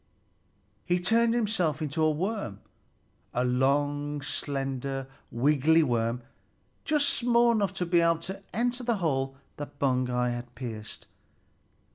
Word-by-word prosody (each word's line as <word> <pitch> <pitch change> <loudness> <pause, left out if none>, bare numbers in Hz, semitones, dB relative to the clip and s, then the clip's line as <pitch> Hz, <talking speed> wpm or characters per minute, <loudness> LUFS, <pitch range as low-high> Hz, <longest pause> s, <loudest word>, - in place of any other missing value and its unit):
He 175 0 +1
turned 230 +5 +3
himself 195 -10 +1
into 155 0 -2
a 155 - +5
worm, 155 - -2 0.7
a 125 - +2
long, 145 +3 +1
slender, 135 -1 -3 0.2
wiggly 150 +5 +3
worm, 120 -2 0 0.6
just 300 -2 +2
small 235 0 +3
enough 200 -4 0
to 180 - -1
be 170 0 +3
able 165 0 +3
to 190 +3 -6
enter 245 +2 -1
the 235 -1 +1
hole 135 -6 -1 0.2
that 145 0 -7
Baugi 125 -3 +1
had 120 0 -7
pierced. 110 -4 -7
145 Hz, 125 wpm, -28 LUFS, 130-190 Hz, 0.7 s, a